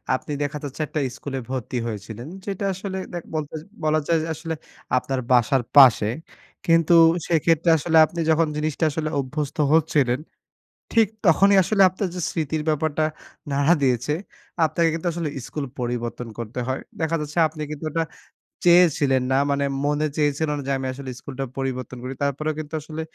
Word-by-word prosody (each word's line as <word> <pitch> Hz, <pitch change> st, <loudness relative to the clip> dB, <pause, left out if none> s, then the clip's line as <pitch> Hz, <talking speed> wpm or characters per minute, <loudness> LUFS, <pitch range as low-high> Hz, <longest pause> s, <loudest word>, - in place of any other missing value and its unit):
আপনি 150 Hz, -, -6 dB
দেখা 145 Hz, +1 st, -3 dB
যাচ্ছে, 145 Hz, +2 st, -5 dB
একটা 155 Hz, -, -3 dB, 0.2 s
স্কুলে 135 Hz, -2 st, -5 dB
ভর্তি 130 Hz, -1 st, -3 dB
হয়েছিলেন। 110 Hz, +4 st, -6 dB, 0.2 s
যেটা 200 Hz, 0 st, -3 dB
আসলে 190 Hz, 0 st, -5 dB, 0.2 s
দেখ 175 Hz, -, -4 dB
বলতে 150 Hz, -1 st, -3 dB, 0.3 s
বলা 155 Hz, 0 st, +3 dB
যায় 165 Hz, -, +3 dB
যে, -, -, -4 dB
আসলে 160 Hz, +1 st, -5 dB, 0.4 s
আপনার 130 Hz, +1 st, -1 dB
বাসার 125 Hz, +1 st, +4 dB
পাশে। 125 Hz, -6 st, +7 dB, 0.6 s
কিন্তু 165 Hz, 0 st, +4 dB, 0.3 s
সেক্ষেত্রে 165 Hz, 0 st, +2 dB
আসলে 160 Hz, +2 st, +1 dB
আপনি 170 Hz, +2 st, -8 dB
যখন 160 Hz, 0 st, +3 dB
জিনিসটা 155 Hz, +1 st, -2 dB
আসলে 155 Hz, +1 st, -2 dB
অভ্যস্ত 140 Hz, +2 st, -3 dB, 0.2 s
হচ্ছিলেন, 145 Hz, -5 st, +2 dB, 0.7 s
ঠিক 225 Hz, -3 st, +5 dB, 0.2 s
তখনই 195 Hz, +4 st, +5 dB
আসলে 200 Hz, +2 st, +1 dB
আপনার 185 Hz, +1 st, -3 dB
যে 180 Hz, -, -3 dB
স্মৃতির 155 Hz, -1 st, -2 dB
ব্যাপারটা 155 Hz, 0 st, 0 dB, 0.5 s
নাড়া 140 Hz, +4 st, +4 dB
দিয়েছে। 130 Hz, +2 st, +1 dB, 0.5 s
আপনাকে 165 Hz, +1 st, +1 dB
কিন্তু 165 Hz, +2 st, -3 dB
আসলে 165 Hz, -3 st, -2 dB, 0.2 s
স্কুল 150 Hz, -2 st, -4 dB
পরিবর্তন 120 Hz, 0 st, -3 dB
করতে 115 Hz, +2 st, -5 dB
হয়। 130 Hz, +1 st, -2 dB, 0.2 s
দেখা 160 Hz, +1 st, +1 dB
যাচ্ছে, 150 Hz, +2 st, -7 dB
আপনি 155 Hz, 0 st, -10 dB
কিন্তু 150 Hz, +1 st, -6 dB
ওটা 165 Hz, +1 st, 0 dB, 0.6 s
চেয়েছিলেন 150 Hz, -7 st, +5 dB
না। 135 Hz, -, +3 dB
মানে 140 Hz, 0 st, +1 dB, 0.2 s
মনে 150 Hz, +1 st, +1 dB
চেয়েছিল 150 Hz, +1 st, +1 dB
না -, -, -4 dB
যে, -, -, 0 dB
"আমি 130 Hz, 0 st, -3 dB
আসলে 135 Hz, 0 st, -8 dB
স্কুলটা 135 Hz, -1 st, -5 dB
পরিবর্তন 130 Hz, -2 st, -3 dB
করি।" 130 Hz, +1 st, -4 dB
তারপরেও 155 Hz, +3 st, -1 dB
কিন্তু 155 Hz, +1 st, -7 dB
আসলে 155 Hz, +1 st, -6 dB
150 Hz, 165 wpm, -23 LUFS, 135-165 Hz, 0.7 s, পাশে